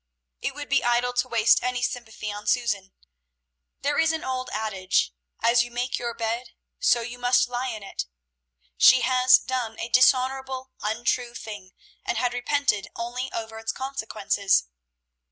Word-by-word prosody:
It - - -3
would 290 0 -6
be 280 -1 +2
idle 240 +1 +2
to 245 +1 0
waste 230 -2 +4
any 250 0 -1
sympathy 220 -4 -4
on 205 0 -8
Susan. 210 -6 0 0.9
There 290 +1 0
is 320 0 +4
an 320 - -3
old 255 -1 -3
adage, 190 - 0 0.3
"As 235 +1 +5
you 240 - -3
make 245 +2 -2
your 235 -1 -4
bed, 230 +2 -3 0.3
so 240 -1 +3
must 245 0 +4
you 245 - -16
lie 250 +2 -1
in 220 -4 -5
it." 195 - -5 0.7
She 260 - +8
had 255 +1 +1 0.2
done 245 -4 -3
a 230 - -4
dishonorable, 260 +1 +2
untrue 235 +3 -1
thing, 205 -5 -8 0.3
and - - -2
had 245 -1 0
repented 245 -5 0
only 245 +3 -4
over 225 -1 -5
its 225 - -2
consequences. 220 - 0
240 Hz, 155 wpm, -25 LUFS, 220-255 Hz, 0.9 s, She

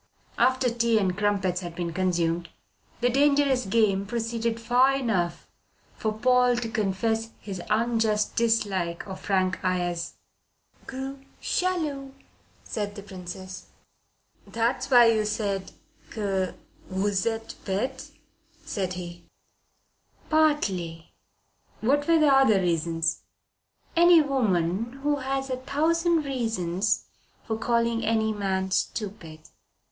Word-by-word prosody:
After 255 +1 +3
tea 235 -1 +2
and 190 -4 +1
crumpets 195 -3 0
had 175 -2 -7
been 170 -1 -3
consumed, 170 -2 0 0.5
the 245 - +3
dangerous 280 -2 +3
game 200 -2 +2
proceeded 230 0 -2
far 250 +4 +3
enough 195 -10 -1 0.5
for 215 - -2
Paul 250 +2 +3
to 235 -1 -3
confess 220 +2 -1
his 190 -4 -6
unjust 220 -1 +1
dislike 200 -7 0
of 190 -1 -7
Frank 185 -2 0
Ayres. 175 -2 -1 0.7
"Gros 270 +1 -5 0.2
jaloux," 300 -7 -1 0.5
said 205 -2 -4
the 200 - -8
Princess. 185 -1 -8 0.8
"That 230 +3 0
was - - -5
why 245 -3 +8
you 220 -1 +1
said 205 -2 -2 0.4
que 195 -3 -2 0.3
vous 190 +1 0
etes 225 0 -3
bete," 225 +7 -3 0.6
said 190 -3 -2
he. 175 -1 -8 1.1
"Partly." 195 - +1 0.7
"What 285 +6 +2
were 335 -1 +5
the 300 -3 +5
other 265 -7 +5
reasons?" 165 -2 0 0.7
"Any 345 0 +7
woman 230 - 0
has 270 -2 -1
a 255 - -1
thousand 325 +5 +1
reasons 220 -8 -1 0.4
for 220 - -2
calling 235 0 0
any 220 0 +1
man 190 -2 -1
stupid." 185 -6 -3
220 Hz, 110 wpm, -26 LUFS, 185-255 Hz, 1.1 s, why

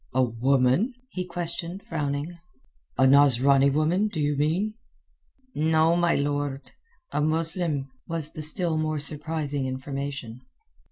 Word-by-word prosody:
"A 130 - +4
woman?" 130 - +1 0.2
he 185 - -3
questioned, 175 +1 -4
frowning. 150 +2 -4 0.6
"A 130 - +4
Nasrani 140 0 +5
woman, 160 +8 +1
do 185 -7 -5
you 145 0 0
mean?" 165 +9 0 0.8
"No, 160 +2 +2
my 175 -1 +2
lord. 145 -1 -2 0.4
A 150 - -1
Muslim," 160 -2 -1 0.2
was 165 -3 -1
the 155 - -6
still 160 +2 +5
more 155 0 -1
surprising 145 -1 -2
information. 130 -2 -5
150 Hz, 120 wpm, -25 LUFS, 140-165 Hz, 0.8 s, Nasrani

